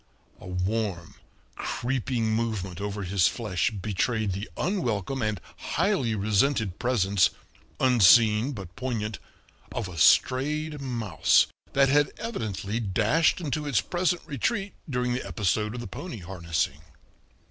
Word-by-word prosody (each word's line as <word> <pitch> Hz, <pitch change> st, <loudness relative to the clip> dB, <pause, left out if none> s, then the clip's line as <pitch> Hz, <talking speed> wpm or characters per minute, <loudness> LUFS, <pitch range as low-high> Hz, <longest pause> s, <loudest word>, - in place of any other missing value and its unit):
A -, -, -11 dB
warm, 90 Hz, -1 st, -2 dB, 0.4 s
creeping 120 Hz, -2 st, -1 dB
movement 105 Hz, -5 st, -2 dB
over 100 Hz, 0 st, -3 dB
his 95 Hz, -1 st, +3 dB
flesh 105 Hz, -6 st, -1 dB
betrayed 105 Hz, +1 st, -1 dB
the 100 Hz, +4 st, -5 dB
unwelcome 135 Hz, -, -1 dB
and 110 Hz, -3 st, -1 dB, 0.2 s
highly 135 Hz, -, 0 dB
resented 105 Hz, 0 st, +1 dB
presence, 100 Hz, -7 st, +3 dB, 0.5 s
unseen 115 Hz, 0 st, +5 dB
but 95 Hz, -6 st, -9 dB
poignant, 115 Hz, -5 st, -3 dB, 0.5 s
of 115 Hz, -5 st, -3 dB
a 85 Hz, -3 st, -7 dB
strayed 150 Hz, -, +3 dB
mouse, 120 Hz, -7 st, +2 dB, 0.3 s
that 135 Hz, 0 st, +4 dB
had 145 Hz, +1 st, +3 dB
evidently 110 Hz, -, -3 dB
dashed 115 Hz, -, +2 dB
into 150 Hz, -2 st, -3 dB
its 140 Hz, -6 st, +2 dB
present 175 Hz, -1 st, 0 dB
retreat 195 Hz, -, -2 dB, 0.2 s
during 125 Hz, -2 st, 0 dB
the 125 Hz, -, -2 dB
episode 105 Hz, +2 st, -1 dB
of 120 Hz, -, -5 dB
the -, -, -6 dB
pony 175 Hz, -1 st, -7 dB
harnessing. 85 Hz, -5 st, -3 dB
110 Hz, 125 wpm, -27 LUFS, 100-135 Hz, 0.5 s, unseen